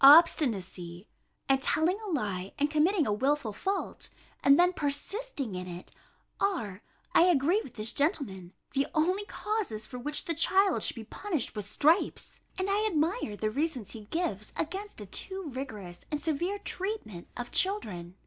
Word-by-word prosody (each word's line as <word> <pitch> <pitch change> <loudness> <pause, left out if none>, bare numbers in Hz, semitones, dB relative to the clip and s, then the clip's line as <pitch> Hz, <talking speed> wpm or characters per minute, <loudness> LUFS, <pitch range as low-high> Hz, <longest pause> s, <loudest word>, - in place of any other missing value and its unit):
Obstinacy, 210 - +6 0.4
and 270 -1 +3
telling 335 +8 +2
a 430 - -5
lie, 200 - -2
and 290 +1 +1
committing 320 +2 +3
a 210 - +1
wilful 260 0 +1
fault, 390 - -2 0.3
and 280 +2 +7
then 360 +1 +5
persisting 290 - -3
in 180 0 -4
it, 175 0 -8 0.5
are, 225 - -1 0.3
I 335 - +7
agree 350 +4 +4
with 250 - -12
this 215 +1 -2
gentleman, 215 - -1 0.2
the 275 0 +2
only 365 +6 +2
causes 410 - -1
for 250 +2 -7
which 295 +4 -1
the 335 - 0
child 380 +4 +4
should - - +2
be 230 - -6
punished 320 - -3
with 210 -2 -2
stripes: 315 - +2 0.2
and 375 0 0
I 415 +2 +2
admire 320 - 0
the 215 0 0
reasons 270 - -1
he 220 -3 -8
gives 215 - -2
against 385 - -4
a - - -6
too 380 - -1
rigorous 210 -10 -6
and 300 - -1
severe 340 +6 -1
treatment 375 - -4
of 245 0 -5
children. 185 - 0
290 Hz, 160 wpm, -30 LUFS, -, 0.5 s, and